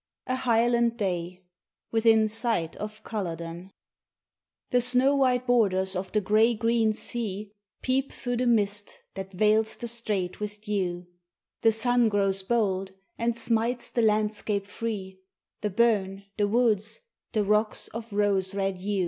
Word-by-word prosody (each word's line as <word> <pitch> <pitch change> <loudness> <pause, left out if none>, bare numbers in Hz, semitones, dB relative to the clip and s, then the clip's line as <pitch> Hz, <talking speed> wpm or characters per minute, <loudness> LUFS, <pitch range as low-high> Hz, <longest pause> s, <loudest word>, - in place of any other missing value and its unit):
XII 255 - 0
A - - +1
HIGHLAND 235 -1 +2
DAY 180 -3 -3 0.5
WITHIN 225 -1 +4
SIGHT 220 -7 -1
OF 215 +1 -7
CULLODEN 170 -3 -5 1.0
THE 250 -1 +4
snow 250 +3 +3
white 255 -2 +2
borders 190 -6 +2
of 185 0 -4
the 215 - +2
grey 220 +4 +3
green 225 0 +2
sea 210 -2 -3 0.3
Peep 265 +1 0
through 245 -1 -3
the 250 +1 0
mist 205 -3 +1 0.2
that 195 0 -7
veils 215 +3 +2
the 240 - -5
strait 210 -6 -2
with 210 0 -5
dew, 185 -4 -2 0.6
The 225 - +5
sun 240 +1 +3
grows 195 -2 +1
bold 195 -3 0 0.3
and 230 0 0
smites 235 +1 0
the 235 - +1
landscape 210 -2 +1
free, 195 -3 -5 0.4
The 210 - -1
burn, 200 -2 +1
the 205 -1 +1
woods, 220 - +1 0.3
the 215 -3 +2
rocks 210 +2 +1
of 230 0 -8
rose 200 -2 +1
red 195 -1 -1
hue. 200 +2 -2
215 Hz, 145 wpm, -27 LUFS, 195-235 Hz, 1.0 s, The